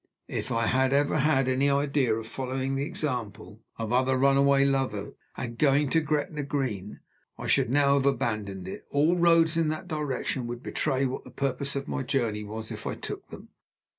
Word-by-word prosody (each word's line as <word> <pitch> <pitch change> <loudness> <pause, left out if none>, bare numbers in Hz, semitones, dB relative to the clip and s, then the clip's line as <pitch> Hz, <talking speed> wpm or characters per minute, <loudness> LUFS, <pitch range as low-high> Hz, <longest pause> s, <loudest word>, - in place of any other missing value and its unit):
If - - -3
I 115 0 +1
had 130 +3 +2
ever 145 +2 +2
had 135 -2 +3
any 130 +2 +2
idea 140 -4 +2
of 110 0 -5
following 130 +2 -3
the 140 +2 -1
example 115 - -4 0.2
of 115 0 -3
other 130 +1 +3
runaway 140 +1 +4
lovers, 135 -7 -1 0.2
and 120 -2 -5
going 145 -1 +3
to 165 - +3
Gretna 150 0 -1
Green, 130 -9 -3 0.4
I - - -7
should - - +2
now 140 +1 +4
have 140 -1 +2
abandoned 105 -8 -1
it. 95 - -8
All 150 +5 +3
roads 165 -2 +4
in 165 -1 +2
that 155 +4 -3
direction 145 -5 -2
would 120 +1 -6
betray 135 -2 0
what 130 - -3
the - - -12
purpose 140 +1 -2
of 140 0 -3
my - - -2
journey 115 -5 -1
was 110 +1 -6
if - - -6
I - - -2
took - - -7
them. - - -11
135 Hz, 190 wpm, -27 LUFS, 120-145 Hz, 0.4 s, runaway